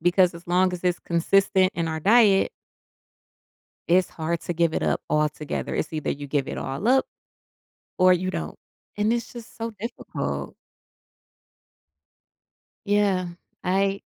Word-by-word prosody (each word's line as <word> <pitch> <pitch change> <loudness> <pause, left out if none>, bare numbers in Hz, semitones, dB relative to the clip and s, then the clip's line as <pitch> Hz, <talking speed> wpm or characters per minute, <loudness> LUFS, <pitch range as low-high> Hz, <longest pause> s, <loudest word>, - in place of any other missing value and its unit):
because 175 +1 +3
as 170 +1 -12
long 185 +1 +3
as 180 0 -5
it's 180 -1 +1
consistent 185 +2 +2
in 170 -1 -1
our 160 0 -3
diet 205 +1 +5 1.4
it's 180 +1 +4
hard 165 +1 -3
to 175 - -3
give 165 -1 +1
it - - -1
up - - +1
altogether. 150 0 -1
It's 160 - -2
either 155 -1 -2
you 145 0 -4
give 140 -1 -1
it - - -4
all 135 +11 -4
up, 265 +2 +4 0.9
or 185 0 +6
you 185 +1 -1
don't, - - -5 0.4
and 210 +2 +2
it's 235 0 -2
just 235 -2 -11
so 230 0 -4
difficult. 230 +4 -5 2.3
Yeah, 200 -3 +2 0.4
I 195 +2 +1
180 Hz, 140 wpm, -24 LUFS, 170-200 Hz, 2.3 s, or